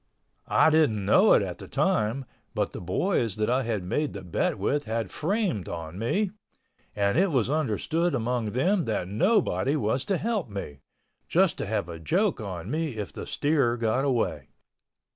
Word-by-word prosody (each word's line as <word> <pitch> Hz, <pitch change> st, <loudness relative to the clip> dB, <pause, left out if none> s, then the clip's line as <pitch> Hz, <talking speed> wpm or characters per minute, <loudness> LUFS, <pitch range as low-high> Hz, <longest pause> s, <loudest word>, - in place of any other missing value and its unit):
I 160 Hz, -, +4 dB
didn't 140 Hz, -11 st, +3 dB
know -, -, +6 dB
it -, -, +4 dB
at -, -, -5 dB
the -, -, -9 dB
time, 110 Hz, +5 st, 0 dB, 0.3 s
but -, -, 0 dB
the -, -, -7 dB
boys 110 Hz, -, 0 dB
that 110 Hz, +2 st, 0 dB
I 130 Hz, +2 st, +2 dB
had 110 Hz, -6 st, -2 dB
made 145 Hz, +11 st, -1 dB
the 100 Hz, -, -7 dB
bet 85 Hz, -, -1 dB
with 145 Hz, +1 st, 0 dB
had 110 Hz, -2 st, -2 dB
framed 185 Hz, -, -1 dB
on 85 Hz, +2 st, -6 dB
me—and 195 Hz, -, -2 dB
it 195 Hz, +1 st, +3 dB
was 130 Hz, -5 st, +1 dB
understood 155 Hz, -, 0 dB
among 120 Hz, -3 st, -1 dB
them 180 Hz, -, +2 dB
that 105 Hz, -5 st, -1 dB
nobody 150 Hz, -, +2 dB
was 125 Hz, -1 st, 0 dB
to 195 Hz, -, +1 dB
help 215 Hz, -, -1 dB
me—just 75 Hz, -9 st, -2 dB
to -, -, -3 dB
have -, -, -1 dB
a 85 Hz, -1 st, -7 dB
joke 180 Hz, -, +1 dB
on 95 Hz, -1 st, -5 dB
me 155 Hz, -6 st, -2 dB
if 105 Hz, -3 st, -5 dB
the -, -, -7 dB
steer 140 Hz, -5 st, +1 dB
got 115 Hz, +3 st, +1 dB
away. 130 Hz, -5 st, 0 dB
125 Hz, 170 wpm, -27 LUFS, 105-160 Hz, 0.3 s, know